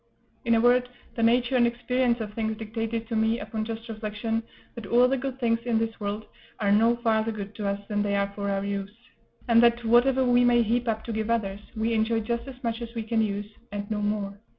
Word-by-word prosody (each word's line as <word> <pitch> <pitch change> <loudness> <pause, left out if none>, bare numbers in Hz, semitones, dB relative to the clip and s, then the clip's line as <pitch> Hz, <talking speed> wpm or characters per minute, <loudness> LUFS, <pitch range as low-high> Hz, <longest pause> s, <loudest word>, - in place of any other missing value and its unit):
In 230 0 +4
a - - +4
word, 245 +1 +4 0.2
the 230 - -3
nature 240 +2 +3
and 240 -1 +5
experience 245 0 0
of 210 -1 -5
things 220 0 -2
dictated 225 +1 -4
to 230 - -3
me, 220 +1 +2
upon 220 -1 -4
just 225 +1 -6
reflection, 220 0 -3 0.3
that 230 -4 -8
all 245 +4 +5
the 270 - +1
good 265 0 -4
things 230 -2 +2
of 235 -2 +2
this 225 0 -2
world 210 +1 -3 0.3
are 200 -2 +2
no 225 +3 +4
farther 225 -2 +1
good 205 -1 -6
to 210 -2 -2
us 200 0 -1
than 205 -1 0
they 205 -1 0
are 200 0 0
for 200 0 -3
our 195 0 -1
use; 200 -1 -3 0.6
and 230 -1 +6
that, 235 0 +3
whatever 250 +3 +4
we 245 0 +4
may 240 -1 +5
heap 240 +2 0
up 220 -1 -1
to 230 - -5
give 220 0 -2
others, 205 -4 0 0.2
we 225 +1 0
enjoy 225 +1 +1
just 235 +2 -3
as 270 - -7
much 230 0 -2
as 235 0 -7
we 225 - -2
can 225 0 +1
use, 205 -1 -1 0.3
and 205 +1 -5
no 210 -1 -1
more. 205 -1 -2
225 Hz, 235 wpm, -26 LUFS, 210-235 Hz, 0.6 s, and